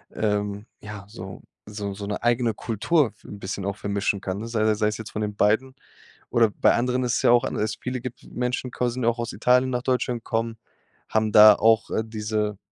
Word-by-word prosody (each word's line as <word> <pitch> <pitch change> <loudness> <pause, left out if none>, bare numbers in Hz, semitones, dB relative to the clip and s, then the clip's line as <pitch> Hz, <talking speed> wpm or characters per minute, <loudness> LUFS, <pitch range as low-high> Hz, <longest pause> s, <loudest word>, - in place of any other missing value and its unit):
ähm, 105 -1 -1 0.2
ja, 105 -1 -8
so 95 -3 -9 0.2
so 100 -1 -5
so 100 +1 -7
'ne 105 - -4
eigene 120 -1 +2
Kultur 120 +8 +1
f 105 - -26
'n 100 - -9
bisschen 95 0 -5
auch 100 -1 -2
vermischen 100 -1 -1
kann, 95 0 -4
ne? 115 - -5
Sei 110 -2 +1
sei 105 0 0
es 105 - -2
jetzt 110 -1 -8
von 110 - -4
den 105 -1 -3
beiden 110 +6 +1 0.5
oder 115 -2 +3
bei - - +3
anderen 125 +2 0
ist 120 -1 0
es - - -1
ja - - +5
auch 120 -1 +5
anders, 105 0 -2
viele 125 0 -3
gibt 125 0 -8
Menschen 125 +1 -2
qu 125 - -1
sind 125 +1 -3
ja 115 - +4
auch 120 0 -3
aus 120 0 -3
Italien 125 +1 +3
nach 125 -1 -2
Deutschland, 125 -2 -1
kommen, 115 0 -2 0.5
haben 110 -1 +1
da 105 -1 +9
auch, 110 0 +3
äh, 110 - -1
diese 105 -1 -2
110 Hz, 220 wpm, -24 LUFS, 105-120 Hz, 0.5 s, da